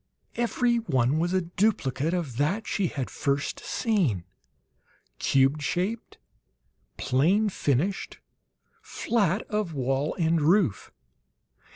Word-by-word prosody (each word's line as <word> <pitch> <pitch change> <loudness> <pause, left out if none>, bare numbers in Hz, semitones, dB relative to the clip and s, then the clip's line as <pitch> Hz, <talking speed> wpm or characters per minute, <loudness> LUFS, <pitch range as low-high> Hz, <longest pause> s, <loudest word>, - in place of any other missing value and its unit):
Every 240 0 +1
one 135 - +1
was 175 +2 0
a 185 0 +2
duplicate 170 -6 0
of 150 -10 -4
that 185 - 0
she 195 -3 0
had 135 -5 -4
first 140 0 -1
seen: 175 - 0 1.0
cube 135 +2 +2
shaped, 185 +9 -2 0.8
plain 185 +12 +2
finished, 165 +2 -1 0.6
flat 205 -3 0
of 210 -7 -3
wall 135 +2 -1
and 165 -2 +1
roof. 165 - +2
170 Hz, 100 wpm, -26 LUFS, 140-205 Hz, 1.0 s, a